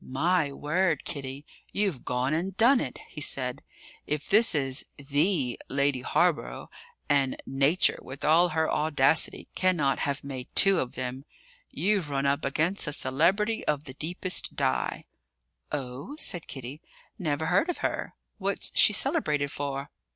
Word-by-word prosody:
"My 155 +3 +1
word, 155 +2 0
Kitty, 135 0 -6 0.3
you've 195 -10 -1
gone 125 +3 -1
and 180 +4 -2
done 245 +4 +5
it!" - - -4
he 150 - -9
said. 125 -3 -1 0.5
"If 150 0 -3
this 215 -3 +4
is 135 -1 0
the 145 -1 0
Lady 140 -1 +1
Hawborough 165 +4 0 0.4
and 140 -2 +2
Nature, 140 +7 +2
with 135 +2 -7
all 165 +4 +5
her 160 0 0
audacity, 150 -1 +2
cannot 170 -7 +1
have 140 -1 -2
made 130 -3 -6
two 195 -3 +6
of 125 - -4
them 130 +1 -4 0.5
you've 195 -5 0
run 140 -1 -1
up 140 +1 +1
against 160 +7 0
a 150 - 0
celebrity 185 - +2
of 150 -1 0
the 135 -4 -9
deepest 175 +5 0
dye." 65 -1 -1 0.7
"Oh?" 140 - -5
said 175 - 0
Kitty. 135 +2 -7 0.4
"Never 155 -3 -1
heard 180 - +2
of 355 - -2
her. - - -3 0.2
What's 195 0 -3
she 210 - +6
celebrated 150 - +1
for?" 140 -1 -4
150 Hz, 145 wpm, -27 LUFS, 135-180 Hz, 0.7 s, two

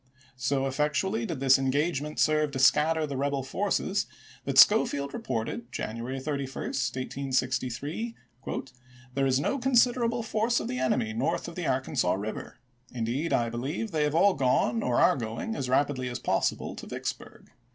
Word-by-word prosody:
So 135 +1 0
effectually 150 +11 0
did 165 -8 -4
this 135 0 +5
engagement 145 +2 -1
serve 155 -1 +3
to - - -3
scatter 155 +4 +4
the 140 -2 -5
rebel 140 0 -1
forces 135 - -1 0.4
that - - -2
Schofield 140 0 +5
reported 120 - -4
January 120 +5 -4
31, 140 -1 -4
1863, 130 - -2 0.5
" 125 0 -23
There 135 +1 +1
is 130 0 +2
no 275 - 0
considerable 240 -2 +2
force 225 +2 +1
of - - -4
the 125 - -3
enemy 115 -4 0
north 120 +9 -1
of 170 - -7
the 175 -1 -3
Arkansas 130 -8 +1
River; 105 +3 -6 0.3
indeed 125 +7 -2
I 115 -1 +1
believe 145 - -3
they 155 -3 0
have 150 +1 -1
all 200 +4 +5
gone 125 -4 +1
or 125 -1 +1
are - - +5
going, 115 - -4
as 130 -10 -3
rapidly 130 -1 +1
as 120 - -4
possible, - - -1
to - - -8
Vicksburg. - - -6
135 Hz, 160 wpm, -28 LUFS, 125-155 Hz, 0.5 s, this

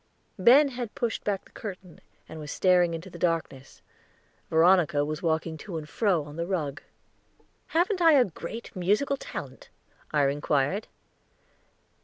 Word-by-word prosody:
Ben 270 +9 +6
had 245 -4 -6
pushed 235 -2 -2
back 200 -2 -2
the - - -21
curtain, 185 -5 -9 0.3
and 160 - -9
was 150 -1 -8
staring 180 -2 +3
into 175 +3 -8
the 170 - -10
darkness; 165 -6 -3 0.7
Veronica 165 -3 +4
was 155 0 -4
walking 160 -1 -1
to 170 +1 -7
and 155 -1 -6
fro 185 -2 +1
on 145 +1 -11
the 170 0 -2
rug. 160 -5 -2 0.9
"Haven't 360 +3 +1
I 330 -2 +7
a 265 -4 +6
great 200 +7 -8
musical 210 +10 +1
talent?" - - -8 0.4
I 145 -2 +2
inquired. 145 +7 0
175 Hz, 145 wpm, -27 LUFS, 155-215 Hz, 0.9 s, I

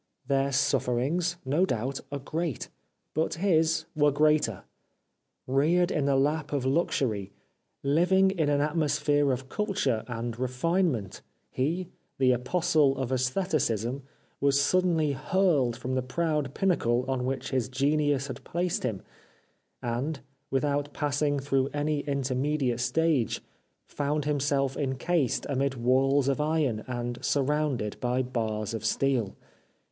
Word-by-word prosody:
Their 135 +1 +1
sufferings, 140 +6 +1
no 145 +7 +2
doubt, 130 -4 -1
are 140 - -2
great, 155 +1 -3 0.4
but 160 +1 0
his 160 -3 +2
were 145 -1 +4
greater. 150 -8 +2 0.8
Reared 160 +7 +2
in 150 -3 0
the 140 -1 +2
lap 145 +2 +1
of 140 -3 -1
luxury, 130 - 0 0.5
living 180 +7 +3
in 160 -6 0
an 145 -1 +2
atmosphere 145 -2 +1
of 130 +1 -3
culture 140 - -1
and 120 -1 -4
refinement, 130 - 0 0.3
he, 165 +7 -1 0.3
the 130 -1 +4
Apostle 135 +2 +2
of 130 -1 -2
^stheticism, 130 - 0 0.4
was 140 0 +3
suddenly 165 0 +2
hurled 140 -4 +1
from 130 +1 -4
the 130 - +1
proud 150 +1 -1
pinnacle 125 -11 +1
on 130 -2 -1
which 130 +1 -3
his 130 -2 0
genius 140 +1 +1
had 130 -4 -7
placed 175 +1 -1
him, 110 -7 -3 0.8
and, 130 +5 -2 0.3
without 145 +1 0
passing 145 0 0
through 135 -1 +1
any 145 0 0
inter 140 -2 -1
mediate 130 -2 0
stage, 130 0 +1 0.5
found 145 0 -2
himself 140 -2 0
encased 140 +1 0
amid 140 0 0
walls 135 +3 +2
of 140 +2 +1
iron 150 -8 0
and 120 -1 -4
surrounded 140 -5 0
by 125 +1 0
bars 110 -4 -2
of 110 -1 -4
steel. 120 -2 0
140 Hz, 130 wpm, -28 LUFS, 125-155 Hz, 0.8 s, were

